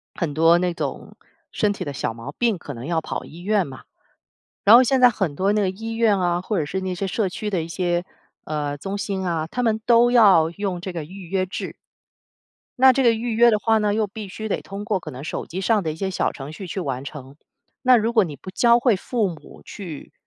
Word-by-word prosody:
很 170 Hz, -8 st, -2 dB
多 165 Hz, +3 st, +5 dB
那 180 Hz, 0 st, 0 dB
种 -, -, -5 dB, 0.4 s
身 210 Hz, -, +1 dB
体 -, -, -5 dB
的 145 Hz, -, -5 dB
小 120 Hz, -, -3 dB
毛 115 Hz, +5 st, -8 dB
病 230 Hz, +1 st, +1 dB
可 145 Hz, -4 st, -8 dB
能 120 Hz, +2 st, -8 dB
要 165 Hz, -2 st, +1 dB
跑 -, -, -5 dB
医 165 Hz, -, -12 dB
院 200 Hz, 0 st, +1 dB
嘛。 130 Hz, -2 st, -11 dB, 0.8 s
然 210 Hz, +3 st, +8 dB
后 250 Hz, -, +8 dB
现 260 Hz, +1 st, +2 dB
在 250 Hz, -, +8 dB
很 190 Hz, -9 st, -2 dB
多 195 Hz, +4 st, +1 dB
那 210 Hz, -, +2 dB
个 190 Hz, -, +1 dB
医 220 Hz, +4 st, -6 dB
院 225 Hz, -3 st, +2 dB
啊， 175 Hz, -1 st, 0 dB
或 205 Hz, +2 st, -2 dB
者 155 Hz, -, -1 dB
是 190 Hz, +6 st, -3 dB
那 185 Hz, -1 st, -2 dB
些 195 Hz, +2 st, -3 dB
社 195 Hz, +1 st, -1 dB
区 210 Hz, +3 st, -4 dB
的 180 Hz, -5 st, -1 dB
一 160 Hz, -, -7 dB
些， 175 Hz, +1 st, -1 dB, 0.4 s
呃， 145 Hz, -1 st, -3 dB
中 195 Hz, +7 st, -4 dB
心 195 Hz, -2 st, -3 dB
啊， 165 Hz, -3 st, -1 dB
他 250 Hz, +9 st, -3 dB
们 220 Hz, -2 st, +1 dB
都 240 Hz, 0 st, +5 dB
要 195 Hz, -9 st, +6 dB
用 185 Hz, -1 st, -4 dB
这 185 Hz, -, -5 dB
个 165 Hz, -4 st, -5 dB
预 185 Hz, 0 st, -11 dB
约 190 Hz, -1 st, 0 dB
制。 185 Hz, -, -6 dB, 1.1 s
那 260 Hz, -1 st, +8 dB
这 270 Hz, -, +1 dB
个 235 Hz, -, +6 dB
预 230 Hz, +1 st, -2 dB
约 235 Hz, +1 st, +6 dB
的 215 Hz, -, +2 dB
话 225 Hz, +1 st, +2 dB
呢， 210 Hz, -1 st, +1 dB
又 215 Hz, -1 st, 0 dB
必 205 Hz, 0 st, -8 dB
须 220 Hz, +3 st, -6 dB
得 210 Hz, -, -2 dB
通 200 Hz, +1 st, -7 dB
过 205 Hz, -4 st, -1 dB
可 155 Hz, -, -8 dB
能 130 Hz, -, -8 dB
手 -, -, -4 dB
机 180 Hz, -, -6 dB
上 205 Hz, +2 st, +2 dB
的 160 Hz, -, -1 dB
一 155 Hz, -, -8 dB
些 195 Hz, +2 st, -2 dB
小 190 Hz, -, 0 dB
程 140 Hz, +2 st, -9 dB
序 190 Hz, -, -8 dB
去 185 Hz, +2 st, -5 dB
完 135 Hz, -5 st, -3 dB
成。 140 Hz, -1 st, -9 dB, 0.5 s
那 255 Hz, -1 st, +6 dB
如 230 Hz, +1 st, 0 dB
果 220 Hz, -4 st, +5 dB
你 150 Hz, -5 st, -6 dB
不 185 Hz, -, -10 dB
教 235 Hz, +4 st, +4 dB
会 240 Hz, -3 st, +3 dB
父 220 Hz, +2 st, -1 dB
母 160 Hz, -5 st, -10 dB
去， 170 Hz, -8 st, -9 dB
190 Hz, 265 characters per minute, -22 LUFS, 165-220 Hz, 1.1 s, 然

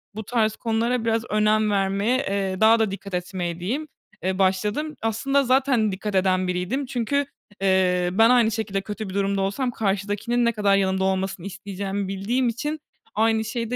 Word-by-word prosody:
bu 220 Hz, -, -5 dB
tarz 220 Hz, -1 st, +1 dB
konulara 230 Hz, +1 st, -1 dB
biraz 225 Hz, 0 st, +1 dB
önem 215 Hz, 0 st, +2 dB
vermeye, 200 Hz, +5 st, +1 dB
eee, 195 Hz, -5 st, -2 dB
daha 225 Hz, +1 st, +6 dB
da 215 Hz, -3 st, +1 dB
dikkat 200 Hz, 0 st, -8 dB
etmeye 180 Hz, -1 st, -3 dB
diyeyim, 265 Hz, -, -3 dB, 0.4 s
eee, 190 Hz, +1 st, -1 dB
başladım. 210 Hz, +11 st, 0 dB
Aslında 275 Hz, +6 st, +1 dB
zaten 255 Hz, -4 st, +2 dB
dikkat 200 Hz, +2 st, -4 dB
eden 185 Hz, -1 st, +2 dB
biriydim 180 Hz, +10 st, -2 dB
çünkü, 265 Hz, +3 st, -1 dB, 0.4 s
eee, 180 Hz, -2 st, +2 dB
ben 225 Hz, +4 st, +5 dB
aynı 240 Hz, -3 st, +4 dB
şekilde 205 Hz, -3 st, -2 dB
kötü 210 Hz, 0 st, -6 dB
bir -, -, -7 dB
durumda 195 Hz, 0 st, 0 dB
olsam 245 Hz, +6 st, -1 dB
karşıdakinin 210 Hz, +3 st, -1 dB
ne 235 Hz, -, +3 dB
kadar 205 Hz, -3 st, +2 dB
yanımda 190 Hz, -1 st, +1 dB
olmasını 190 Hz, -1 st, -1 dB
isteyeceğimi 200 Hz, 0 st, -4 dB
bildiğim 230 Hz, +6 st, 0 dB
için 295 Hz, +7 st, -3 dB, 0.4 s
aynı 220 Hz, +1 st, +2 dB
şeyi 230 Hz, +1 st, -3 dB
de -, -, 0 dB
210 Hz, 170 wpm, -24 LUFS, 195-230 Hz, 0.4 s, daha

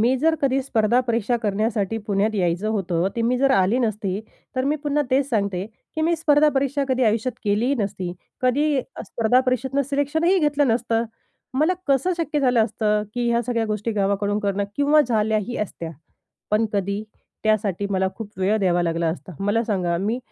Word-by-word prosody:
मी 245 Hz, +4 st, +3 dB
जर 320 Hz, +3 st, +3 dB
कधी 270 Hz, 0 st, +2 dB
स्पर्धा 235 Hz, -2 st, +2 dB
परीक्षा 235 Hz, -1 st, 0 dB
करण्यासाठी 215 Hz, +1 st, 0 dB
पुण्यात 210 Hz, +2 st, +1 dB
यायचं 180 Hz, +1 st, 0 dB
होतं, 185 Hz, -4 st, 0 dB
ते 230 Hz, -, 0 dB
मी 245 Hz, +2 st, +2 dB
जर 275 Hz, +1 st, +3 dB
आली 195 Hz, +2 st, +3 dB
नसती, 210 Hz, -5 st, -1 dB, 0.4 s
तर 255 Hz, -, +1 dB
मी 290 Hz, +2 st, +1 dB
पुन्हा 295 Hz, 0 st, 0 dB
तेच 270 Hz, +1 st, +2 dB
सांगते 200 Hz, -6 st, -1 dB, 0.3 s
की 315 Hz, -, -2 dB
मी 335 Hz, +2 st, +3 dB
स्पर्धा 300 Hz, -1 st, +4 dB
परीक्षा 280 Hz, +1 st, +1 dB
कधी 260 Hz, 0 st, +1 dB
आयुष्यात 225 Hz, +3 st, +1 dB
केलीही 215 Hz, +7 st, +2 dB
नसती. 195 Hz, -4 st, -3 dB, 0.3 s
कधी 275 Hz, +2 st, +2 dB, 0.2 s
स्पर्धा 235 Hz, +2 st, +2 dB
परीक्षेतनं 265 Hz, +2 st, 0 dB
सिलेक्शनही 315 Hz, +6 st, +2 dB
घेतलं 295 Hz, -4 st, +2 dB
नसतं. 230 Hz, 0 st, +1 dB, 0.5 s
मला 310 Hz, +6 st, +3 dB
कसं 280 Hz, +7 st, +2 dB
शक्य 315 Hz, -3 st, -1 dB
झालं 245 Hz, -4 st, +3 dB
असतं? 210 Hz, -1 st, 0 dB
की 245 Hz, -1 st, 0 dB
ह्या 235 Hz, -, +2 dB
सगळ्या 230 Hz, -1 st, -1 dB
गोष्टी 215 Hz, +1 st, -2 dB
गावाकडून 205 Hz, 0 st, 0 dB
करणं 200 Hz, -1 st, -1 dB
किंवा 290 Hz, +2 st, +4 dB
झाल्याही 220 Hz, 0 st, 0 dB
असत्या. 170 Hz, -5 st, -4 dB, 0.6 s
पण 215 Hz, +2 st, +3 dB
कधी, 200 Hz, +1 st, -1 dB, 0.4 s
त्यासाठी 205 Hz, -3 st, +1 dB
मला 190 Hz, -1 st, +1 dB
खूप 220 Hz, -2 st, -7 dB
वेळ 195 Hz, +3 st, +2 dB
द्यावा 175 Hz, -3 st, +2 dB
लागला 170 Hz, 0 st, 0 dB
असता. 180 Hz, +3 st, -5 dB
मला 205 Hz, +4 st, +1 dB
सांगा 180 Hz, -6 st, 0 dB
मी 215 Hz, +6 st, -1 dB
225 Hz, 175 wpm, -23 LUFS, 200-265 Hz, 0.6 s, स्पर्धा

